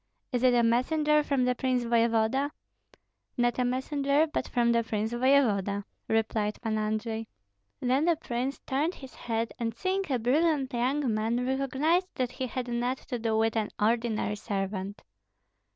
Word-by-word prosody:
Is 245 -3 0
it 250 -1 +4
a 240 - +4
messenger 300 +6 +3
from 275 -4 +1
the 250 - +2
prince 255 -1 0
voevoda?" 235 +3 +2 0.9
"Not 240 0 +1
a - - +3
messenger, 280 +4 +1
but 310 - -3
from 235 -1 +2
the 235 0 +3
prince 220 0 -2
voevoda," 230 -6 +2 0.2
replied 220 -1 0
Pan 220 -2 0
Andrei. 220 +1 -2 0.5
Then 260 +4 +2
the 340 -1 +4
prince 260 -2 -3
turned 300 +7 0
his 265 -2 -11
head, 230 -1 -3
and 230 -1 -2
seeing 380 +4 -1
a 255 - +2
brilliant 275 +3 +1
young 255 +1 0
man, 225 +3 0
recognized 275 +7 +1
that 250 -1 -1
he 255 +1 -4
had 250 0 -4
not 240 +2 -1
to 245 - -2
do 220 -1 0
with 225 0 +1
an 215 -2 0
ordinary 220 -1 +1
servant. 195 -1 -4
245 Hz, 160 wpm, -28 LUFS, 225-270 Hz, 0.9 s, it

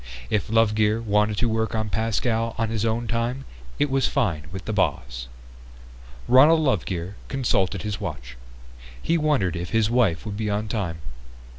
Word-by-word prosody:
If 105 -1 0
Lovegear 110 -1 +3
wanted 105 -1 +1
to 120 - +1
work 110 0 -1
on 110 -1 -2
Pascal 115 +1 0
on 115 -1 0
his 115 -1 -1
own 115 +1 0
time 120 +4 -2 0.3
it 145 - +2
was 135 0 +2
fine 90 - -1
with 95 0 -7
the 110 - -2
boss. 60 -11 -1 1.0
Ronald 150 +6 +6
Lovegear 95 - -1
consulted 100 -8 0
his 105 -2 -4
watch. 65 -7 -6 0.6
He 165 - 0
wondered 150 - +1
if 85 0 -4
his 110 0 +1
wife 115 -9 +2
would 105 -2 -5
be 110 -1 -2
on 105 +1 -1
time. 90 -7 -3
110 Hz, 160 wpm, -24 LUFS, 95-115 Hz, 1.0 s, Ronald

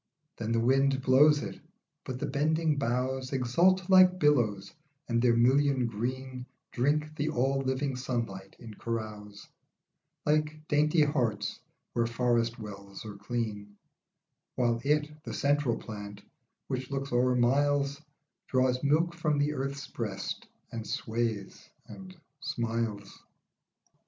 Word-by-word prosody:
Then 115 0 -4
the 115 - +2
wind 135 +3 +3
blows 145 +3 +5
it, - - -6 0.5
but 130 - -4
the - - -2
bending 155 +2 +1
boughs 130 +1 -1
Exult 170 +9 +2
like 185 -1 +7
billows, 115 - +2 0.3
and 115 -1 +1
their 120 -1 +4
million 130 +2 +3
green 125 +3 -4 0.2
Drink 150 +4 0
the 150 +1 -1
all 135 -1 +1
living 135 0 -1
sunlight 115 -7 -4
in 115 -3 -10
carouse, 105 -2 -6 0.8
Like 150 +1 0
dainty 150 +2 +3
harts 135 -7 -1 0.3
where 115 -1 +1
forest 115 0 +1
wells 100 -2 -9
are 105 - -6
clean, 105 -1 -4 0.8
While 120 -2 +1
it, 150 +1 0
the - - -5
central 140 -5 +1
plant, 105 -1 -8 0.4
which 130 -1 -4
looks 140 0 -3
o'er 125 +1 +3
miles, 140 +3 +2 0.5
Draws 130 0 +1
milk 160 +4 +2
from 155 -3 0
the 145 +1 +1
earth's 140 +1 -3
breast, 105 -6 -5 0.2
and 115 -1 -5
sways, 110 -3 -3 0.2
and 185 -1 -11 0.2
smiles. 115 -8 -3
130 Hz, 125 wpm, -30 LUFS, 115-145 Hz, 0.8 s, like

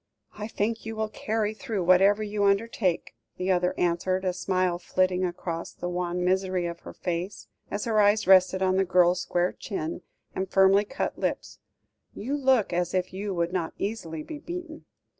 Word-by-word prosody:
"I 210 0 -6
think 225 +1 -2
you 225 0 -5
will 220 0 -2
carry 215 0 -1
through 220 -5 -3
whatever 195 +4 +5
you 205 -1 -2
undertake," 200 -3 +1 0.2
the 185 +1 0
other 180 0 +1
answered, 185 +2 0
a 185 - +1
smile 185 -1 0
flitting 185 +1 +1
across 175 -2 -4
the 175 - -5
wan 180 0 -2
misery 185 -1 +1
of 170 0 -4
her - - -10
face, 180 +3 -4 0.2
as 205 - -3
her 220 -2 +3
eyes 205 +1 +4
rested 190 0 +5
on 185 0 +2
the 195 - +4
girl's 180 -1 +3
square 175 +1 0
chin, 165 -4 -5 0.3
and 190 0 -3
firmly 195 +2 +5
cut 270 - -3
lips; - - -3 0.6
"you 265 +7 -3
look 260 -9 +2
as 175 +1 0
if 185 0 -1
you 195 0 -3
would 170 +1 -1
not 170 -3 -2
easily 170 -7 -4
be 305 - -7
beaten." 340 -1 -7
190 Hz, 180 wpm, -27 LUFS, 180-210 Hz, 0.6 s, whatever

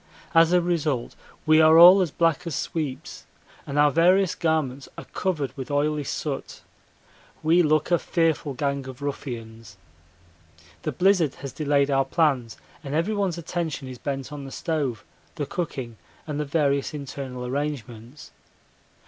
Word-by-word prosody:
As 165 0 +5
a 180 0 +4
result 155 -8 -1 0.3
we 155 0 +6
are 160 +1 +7
all 180 +3 +9
as 180 - 0
black 165 +2 0
as 160 - -3
sweeps 155 +1 -5 0.4
and 140 0 -4
our 145 0 +5
various 180 +4 +4
garments 150 -5 -1
are - - -8
covered 150 -9 -3
with 135 -1 -7
oily 145 +1 0
soot. - - -5 0.8
We 165 +3 +4
look 155 0 +1
a 175 - +4
fearful 160 -4 0
gang 140 -1 -2
of 130 +1 -9
ruffians. 115 -7 -6 1.0
The - - -2
blizzard 180 -6 +2
has 140 - -8
delayed 145 -2 +1
our 135 0 +2
plans 135 -6 0 0.3
and 140 0 -4
everyone's 190 +1 0
attention 165 -4 -4
is 130 -2 -9
bent 135 0 -4
on 145 -1 -7
the 135 - -8
stove, 145 - -2 0.3
the 150 - -3
cooking, 130 -9 -5 0.3
and 150 -2 -4
the 150 - -1
various 140 0 0
internal 135 -3 -6
arrangements. 130 -2 -5
150 Hz, 150 wpm, -25 LUFS, 135-165 Hz, 1.0 s, all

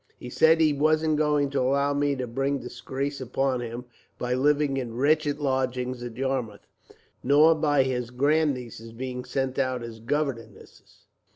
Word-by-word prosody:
He 125 - -9
said 160 +4 +4
he 155 -2 +4
wasn't 155 +1 +2
going 150 -2 +1
to 140 - 0
allow 140 +2 +1
me 145 0 +1
to 130 -1 -3
bring 135 +4 -1
disgrace 135 +2 -5
upon 130 0 -1
him, 120 +1 -6 0.3
by 125 0 -2
living 145 +1 +2
in 120 -3 -4
wretched 145 +2 +1
lodgings 130 -2 -1
at 120 -1 -7
Yarmouth, 130 -6 -3 0.6
nor 150 +5 +6
by 145 -3 +2
his 125 -2 -2
grandnieces 125 -4 -1
being 125 +1 -5
sent 135 0 -2
out 130 -2 -1
as 115 -1 -8
governesses. 115 -3 -5
135 Hz, 155 wpm, -26 LUFS, 125-145 Hz, 0.6 s, nor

